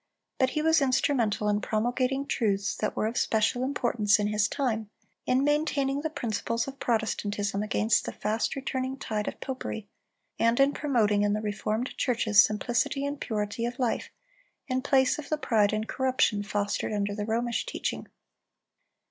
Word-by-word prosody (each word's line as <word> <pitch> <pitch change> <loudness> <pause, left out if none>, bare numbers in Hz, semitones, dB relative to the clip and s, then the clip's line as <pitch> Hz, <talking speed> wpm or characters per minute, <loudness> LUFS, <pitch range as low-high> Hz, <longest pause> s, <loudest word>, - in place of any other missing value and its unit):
But 260 - +4
he 305 - +1
was 320 -1 +4
instrumental 250 -5 +1
in 210 0 +1
promulgating 250 +6 0
truths 200 -6 0
that 215 - -2
were - - 0
of 230 +3 -1
special 225 +3 +1
importance 240 -6 +2
in 210 - 0
his 210 0 +2
time, 225 -7 -2 0.4
in 255 +2 +3
maintaining 285 -2 +1
the 315 - -2
principles 230 -3 -2
of 275 0 -8
Protestantism 205 -3 -1
against 215 +1 +1
the - - -3
fast 215 +2 -1
returning 265 -1 -3
tide 215 -5 -3
of - - -5
popery, 255 -5 -5 0.5
and 230 +2 +3
in 275 +1 +5
promoting 220 -8 +2
in 205 0 +2
the 210 - 0
reformed 215 +3 -2
churches 225 -4 +4
simplicity 240 +5 0
and 285 0 -4
purity 210 +1 -2
of 240 +1 -2
life, 245 -3 -1 0.6
in 255 -1 0
place 265 0 +3
of 305 - -8
the 310 - +1
pride 215 -8 +2
and 215 +1 -2
corruption 260 -5 +1
fostered 205 0 -2
under 205 -1 -1
the 205 0 -4
Romish 235 - -1
teaching. - - -3
230 Hz, 165 wpm, -28 LUFS, 210-265 Hz, 0.6 s, in